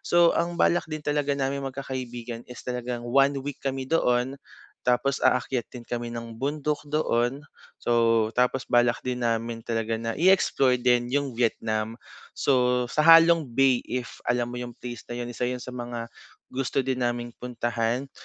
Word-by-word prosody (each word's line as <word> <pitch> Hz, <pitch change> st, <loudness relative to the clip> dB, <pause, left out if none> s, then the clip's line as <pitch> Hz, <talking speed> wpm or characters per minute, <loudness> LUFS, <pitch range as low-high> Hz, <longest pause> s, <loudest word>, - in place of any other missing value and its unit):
So, 175 Hz, -1 st, +5 dB
ang 170 Hz, 0 st, 0 dB
balak 175 Hz, -, +3 dB
din 155 Hz, -, -4 dB
talaga 145 Hz, -1 st, 0 dB
naming 135 Hz, 0 st, -2 dB
magkakaibigan 125 Hz, -3 st, -6 dB
is 125 Hz, -, -8 dB
talagang 125 Hz, -1 st, -3 dB
1 135 Hz, +3 st, +3 dB
week 145 Hz, -2 st, -5 dB
kami 135 Hz, -1 st, -2 dB
doon. 130 Hz, -4 st, +1 dB, 0.5 s
Tapos 125 Hz, +2 st, +2 dB
aakyat 125 Hz, -2 st, +1 dB
din 120 Hz, -2 st, -9 dB
kami 120 Hz, -1 st, -4 dB
ng 115 Hz, -1 st, -7 dB
bundok 150 Hz, +1 st, -1 dB
doon. 130 Hz, -3 st, +1 dB, 0.4 s
So 115 Hz, -2 st, +3 dB
tapos 125 Hz, +1 st, +1 dB
balak 120 Hz, -1 st, +3 dB
din 125 Hz, -1 st, -2 dB
namin 115 Hz, 0 st, -1 dB
talaga 115 Hz, -1 st, -1 dB
na 115 Hz, 0 st, -2 dB
i-explore 165 Hz, -8 st, +4 dB
din 120 Hz, -1 st, +3 dB
yung 140 Hz, -3 st, 0 dB
Vietnam. 110 Hz, -2 st, 0 dB, 0.4 s
So, 125 Hz, -2 st, +2 dB
sa -, -, +1 dB
Ha 165 Hz, 0 st, +10 dB
Long 165 Hz, -3 st, +3 dB
Bay 130 Hz, 0 st, +3 dB
if 125 Hz, -1 st, -4 dB
alam 120 Hz, 0 st, 0 dB
mo 125 Hz, -, -5 dB
yung 120 Hz, -1 st, -6 dB
place 120 Hz, -2 st, -8 dB
na 120 Hz, -, -5 dB
yun, 120 Hz, 0 st, -4 dB
isa 120 Hz, 0 st, -2 dB
yun 125 Hz, 0 st, -3 dB
sa 125 Hz, -, -7 dB
mga 120 Hz, -1 st, -5 dB, 0.4 s
gusto 135 Hz, +1 st, -1 dB
din 130 Hz, 0 st, -2 dB
naming 120 Hz, 0 st, -1 dB
puntahan. 120 Hz, +1 st, -2 dB
125 Hz, 170 wpm, -26 LUFS, 120-135 Hz, 0.5 s, Ha